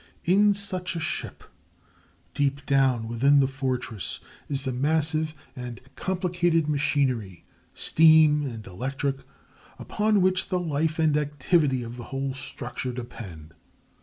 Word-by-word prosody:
In 205 +3 +4
such 185 -3 -2
a - - -2
ship, 155 - -4 0.9
deep 140 0 -1
down 130 -5 +2
within 135 +5 +4
the 135 - +4
fortress 130 -5 -2 0.3
is 140 -1 -2
the 130 - -2
massive 155 +3 0 0.2
and 125 -2 -7 0.2
complicated 175 -3 0
machinery, 135 - 0 0.3
steam 155 -2 +5
and 115 -4 -7
electric, 135 +8 -3 0.6
upon 210 -1 +1
which 185 0 +2
the 180 - +1
life 160 -1 -1
and 160 -2 +3
activity 145 -2 +1
of 120 +1 -8
the 120 - -7
whole 135 0 -3
structure 125 -1 -5
depend. 100 -10 -9
140 Hz, 125 wpm, -26 LUFS, 125-160 Hz, 0.9 s, steam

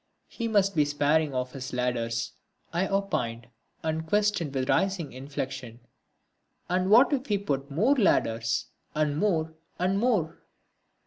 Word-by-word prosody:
He 230 - -4
must 200 -3 +2
be 150 - +5
sparing 145 0 +1
of 125 0 -2
his 135 -1 -7
ladders, 120 -2 -1 0.4
I 180 +3 +1
opined, 140 - -2 0.3
and 160 0 -2
questioned 205 -5 +1
with 130 - +1
a - - +4
rising 190 -6 0
inflection, 130 -3 -6 0.9
"And 185 +1 +1
what 245 +8 +6
if 270 0 -1
we 205 - +3
put 140 -8 -2
more 205 - +3
ladders, 115 - +2 0.3
and 150 -1 +1
more, 160 -3 0 0.2
and 185 +2 +1
more?" 200 -9 +1
160 Hz, 140 wpm, -27 LUFS, 130-195 Hz, 0.9 s, what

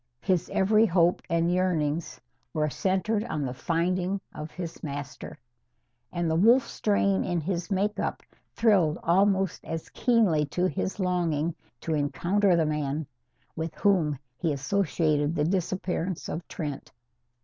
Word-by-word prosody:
His 180 -2 +1
every 215 +3 +4
hope 175 -1 +3
and 170 +1 +2
yearning 170 -4 +1 0.5
were 150 -1 +1
centred 190 - 0
on 150 -10 -2
the 125 - -3
finding 180 +6 0
of 150 +1 -6
his 170 -1 -7
master. 140 -3 -6 0.7
And 175 -1 -1
the 160 - +1
wolf 235 +8 +5
strain 200 -2 +1
in 175 -1 -1
his 175 +2 -3
make 205 +1 0
up - - -2 0.3
thrilled 190 -9 +3
almost 195 +2 +2
as 165 -1 -5
keenly 200 - +2
to 180 +5 0
his 190 +2 -2
longing 170 -4 0 0.3
to 165 - -2
encounter 175 +6 +2
the 165 -2 +2
men 150 0 -1 0.5
with 160 -1 -4
whom 170 -8 +2 0.2
he 165 - +1
associated 150 0 +1
the 150 - +1
disappearance 185 0 -2
of 165 - -5
Trent. 145 -4 -5
175 Hz, 140 wpm, -27 LUFS, 155-190 Hz, 0.7 s, wolf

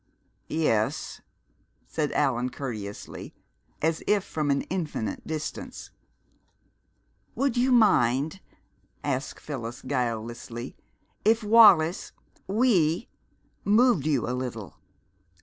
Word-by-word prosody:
"Yes," 115 -9 0 0.6
said 150 -2 -2
Allan 125 -3 +1
courteously, 110 -7 -7 0.5
as 160 0 +1
if 205 -2 +3
from 155 -2 -2
an 140 0 +2
infinite 160 - -4
distance. 155 -1 -5 1.4
"Would 275 -3 0
you 250 +2 +2
mind," 155 - +3 0.6
asked 135 -1 -3
Phyllis 120 -5 -6
guilelessly, 120 -1 -3 0.5
"if 220 +2 +3
Wallis 205 -6 +6 0.3
we 195 -5 +2 0.5
moved 210 - +4
you 140 -7 +1
a 125 - -1
little? 125 -5 -5
150 Hz, 90 wpm, -27 LUFS, 125-200 Hz, 1.4 s, Wallis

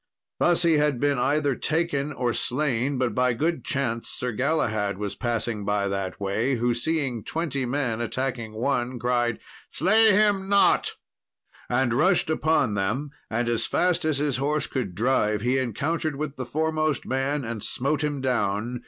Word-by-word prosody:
Thus 175 0 +3
he 165 -2 +4
had 150 -4 +1
been 145 -1 +1
either 145 +2 +1
taken 150 0 -1
or 125 -4 -1
slain, 135 0 0
but 125 -1 0
by 125 -1 +2
good 160 +8 -1
chance 120 -5 -2
Sir 125 - -3
Galahad 110 -6 0
was 100 -1 -3
passing 115 -3 -2
by 100 0 0
that 95 -1 -3
way, 110 +7 0
who, 120 +1 +1
seeing 125 -3 -1
twenty 145 -6 -2
men 125 -3 -1
attacking 120 -2 -3
one, 125 +2 -1
cried, 120 -1 0 0.3
"Slay 215 +7 +4
him 200 -1 +2
not," 200 0 +4 0.8
and 125 -1 +1
rushed 160 +4 +3
upon 155 -7 +2
them; 115 +9 -1 0.2
and, 115 +2 -1
as 120 -1 0
fast 180 -1 +1
as 155 -3 +1
his 145 -2 0
horse 145 +3 0
could 110 -10 -4
drive, 105 -2 +1
he 125 +3 +1
encountered 145 +5 -1
with 145 0 -4
the 130 -3 -5
foremost 155 +1 0
man, 135 +1 -1
and 115 -2 -4
smote 145 +4 0
him 145 -2 -2
down. 120 -1 -1
130 Hz, 160 wpm, -25 LUFS, 120-150 Hz, 0.8 s, he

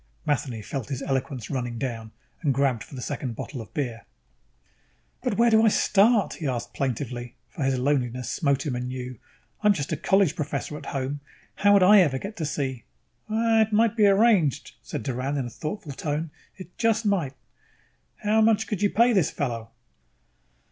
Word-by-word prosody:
Matheny 130 -6 -1
felt 130 +5 -5
his 135 -1 -3
eloquence 130 -3 -3
running 120 -3 -3
down 115 -4 -4 0.3
and 145 -6 +1
grabbed 135 -5 +1
for - - -12
the 125 - -6
second 135 -4 -4
bottle 130 +2 -6
of 110 - -12
beer. 120 -6 -3 1.1
"But - - -1
where 235 0 +4
do 220 0 +6
I - - +6
start?" 210 +1 +3
he 155 - -3
asked 125 -3 -3
plaintively, 125 -2 -3
for 165 - -9
his 135 -1 +1
loneliness 125 -2 0
smote 140 -2 0
him 135 -4 -1
anew. 125 -1 -5 0.4
"I'm 210 -1 +5
just 150 -5 -4
a 155 - 0
college 190 0 +2
professor 150 -1 -3
at - - -9
home. 135 +1 -3 0.4
How 205 0 +5
would 200 -2 +6
I 200 +1 +8
even 135 -5 0
get 205 +7 -7
to 155 - -2
see 130 -5 -3 0.3
" - - -39 0.3
"It 220 0 +1
might 225 +1 +3
be 210 -3 +5
arranged," 200 - +3
said - - -5
Doran 130 +4 -2
in 135 - -1
a 120 - -7
thoughtful 155 - -5
tone. 150 +3 -3 0.3
"It 185 -2 -11
just 225 -1 +2
might. 175 -10 0 0.9
How 215 +1 +3
much 220 0 +3
could 210 -3 -3
you 205 - +3
pay 235 +4 +4
this 190 -8 +3
fellow?" 115 -5 -3
145 Hz, 185 wpm, -25 LUFS, 125-200 Hz, 1.1 s, I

